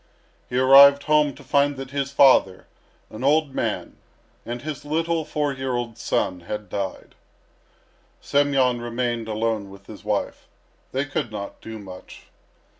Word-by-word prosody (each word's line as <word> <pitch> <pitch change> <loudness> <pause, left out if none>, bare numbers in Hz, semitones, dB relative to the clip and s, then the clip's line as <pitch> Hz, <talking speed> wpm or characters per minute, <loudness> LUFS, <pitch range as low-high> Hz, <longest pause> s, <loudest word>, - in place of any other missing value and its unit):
He 125 - -2
arrived 140 +2 +7
home 150 -3 +2
to 145 - -14
find 140 0 +1
that 135 0 -7
his 140 -1 -2
father, 130 -9 +4 0.5
an 110 +3 -8
old 145 0 +2
man, - - -3 0.5
and 120 +1 -5
his 155 -2 -6
little 165 +2 -1
four 150 -2 -1
year 130 -1 -3
old 120 -2 -4
son 90 -1 -1
had 105 +5 -7
died. 95 -2 -5 1.1
Semyon 135 -4 +1
remained 120 -1 -3
alone 110 -2 -2
with 100 0 -14
his - - -12
wife. - - -3 0.4
They 135 +2 -1
could 145 -4 -3
not 100 -2 -7
do 110 0 -8
much. 95 -3 -12
130 Hz, 145 wpm, -23 LUFS, 110-145 Hz, 1.1 s, arrived